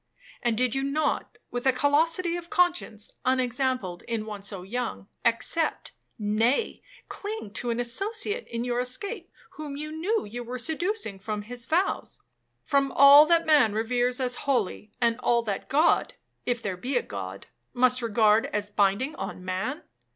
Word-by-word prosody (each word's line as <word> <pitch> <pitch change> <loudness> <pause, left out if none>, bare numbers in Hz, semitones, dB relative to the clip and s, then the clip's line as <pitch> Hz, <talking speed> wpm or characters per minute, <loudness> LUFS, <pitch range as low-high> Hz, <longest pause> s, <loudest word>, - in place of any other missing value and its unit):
And 235 -2 0
did 250 -1 +1
you 270 - +1
not, 290 +3 -1
with 245 +2 -2
a - - +7
callosity 325 +6 +2
of 345 0 -7
conscience 350 - 0
unexampled 255 -6 0
in 230 -2 -2
one 210 -2 -7
so 195 -2 -4
young, 200 - -4 0.2
accept, 245 +7 +1 0.3
nay, 225 - +1 0.3
cling 415 - -6
to 245 - -3
an 235 0 -1
associate 415 - -2
in 235 0 -3
your 245 0 -1
escape 350 - -2 0.3
whom 295 -2 -6
you 305 +1 -5
knew 370 +8 -1
you 240 +4 -6
were 245 +2 -5
seducing 320 - -2
from 210 +1 -4
his 240 +2 -7
vows,—from 285 -5 -2
all 285 +2 +9
that 335 0 +4
man 290 -9 +5
reveres 245 +3 0
as 250 -1 -1
holy, 215 -5 0
and 235 0 +2
all 235 -1 +2
that 205 -3 -4
God 305 +5 +3 0.3
(if 240 -2 0
there 190 -3 -3
be 250 +7 -1
a - - 0
God) 95 -1 -7 0.3
must 250 0 +3
regard 220 -1 +3
as 210 0 -3
binding 205 +8 +1
on 185 - -6
man? 190 - -3
250 Hz, 160 wpm, -27 LUFS, 220-305 Hz, 0.3 s, all